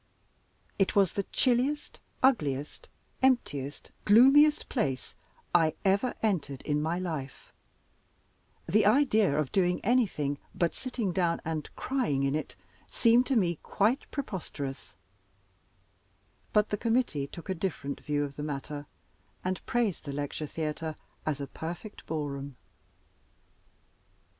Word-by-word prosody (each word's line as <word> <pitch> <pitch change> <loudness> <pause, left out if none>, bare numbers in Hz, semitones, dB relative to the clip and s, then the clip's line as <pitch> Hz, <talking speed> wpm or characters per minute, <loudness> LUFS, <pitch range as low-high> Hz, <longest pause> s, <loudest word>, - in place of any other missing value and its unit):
It 195 - +2
was 195 -3 +5
the 200 - -2
chilliest, 265 +4 +1 0.2
ugliest, 150 - +1 0.3
emptiest, 145 - 0
gloomiest 275 +8 +6
place 135 - -2 0.4
I 165 -3 +4
ever 200 +6 +2
entered 145 -11 -1
in 150 -1 0
my 160 +3 0
life; 160 -7 -5 1.1
the 210 0 +4
idea 220 - +4
of 150 -3 0
doing 180 -2 +2
anything 185 - +1 0.2
but 170 -1 +1
sitting 245 -7 -3
down 170 -1 +1
and 155 -2 -3
crying 200 - 0
in 135 0 +1
it 155 - -3 0.3
seemed 235 +2 +4
to 270 - +1
me 175 -7 +2
quite 225 +7 +1
preposterous; 165 - -5 1.6
but 210 0 +3
the 210 - -1
committee 225 - 0
took 170 - -10
a 190 - 0
different 160 -6 -3
view 145 -1 0
of 140 -1 -6
the - - -4
matter, 145 0 -5 0.6
and 185 0 -2
praised 235 -7 0
the 140 - -4
Lecture 145 +2 -3
Theater 155 +1 -3 0.3
as 150 -3 0
a 140 - -3
perfect 175 +9 -7
ballroom. 140 -3 -4
175 Hz, 125 wpm, -29 LUFS, 145-225 Hz, 1.6 s, gloomiest